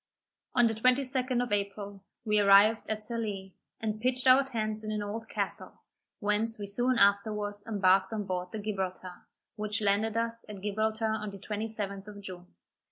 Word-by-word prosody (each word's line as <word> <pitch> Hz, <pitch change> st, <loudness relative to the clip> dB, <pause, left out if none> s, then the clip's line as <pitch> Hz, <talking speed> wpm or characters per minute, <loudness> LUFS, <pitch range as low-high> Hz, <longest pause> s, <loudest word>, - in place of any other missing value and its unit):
On 240 Hz, -, +6 dB
the 225 Hz, -, +2 dB
22d 255 Hz, +1 st, +1 dB
of 245 Hz, -, -6 dB
April, 200 Hz, -1 st, -3 dB, 0.2 s
we 210 Hz, -1 st, +3 dB
arrived 205 Hz, +2 st, +6 dB
at 215 Hz, -1 st, -2 dB
Sallee, 210 Hz, -4 st, -3 dB, 0.3 s
and 215 Hz, -1 st, -3 dB
pitched 255 Hz, +1 st, +1 dB
our 260 Hz, +1 st, +7 dB
tents 215 Hz, -4 st, -3 dB
in 215 Hz, -, -3 dB
an 210 Hz, -1 st, -2 dB
old 220 Hz, +2 st, -5 dB
castle, -, -, -4 dB, 0.4 s
whence 215 Hz, +2 st, 0 dB
we 205 Hz, -, -5 dB
soon 245 Hz, +5 st, +1 dB
afterwards 205 Hz, 0 st, +2 dB
embarked 195 Hz, -2 st, +3 dB
on 215 Hz, -2 st, -2 dB
board 180 Hz, -2 st, -3 dB
the -, -, -4 dB
Gibraltar, 190 Hz, -3 st, -4 dB, 0.3 s
which 210 Hz, -1 st, -1 dB
landed 215 Hz, +2 st, +1 dB
us 230 Hz, 0 st, -1 dB
at 200 Hz, -2 st, -8 dB
Gibraltar 220 Hz, +2 st, 0 dB
on 215 Hz, -1 st, -2 dB
the 200 Hz, -, -9 dB
27th 205 Hz, -1 st, -4 dB
of 205 Hz, -1 st, -9 dB
June. 185 Hz, -3 st, -9 dB
210 Hz, 165 wpm, -30 LUFS, 200-225 Hz, 0.4 s, our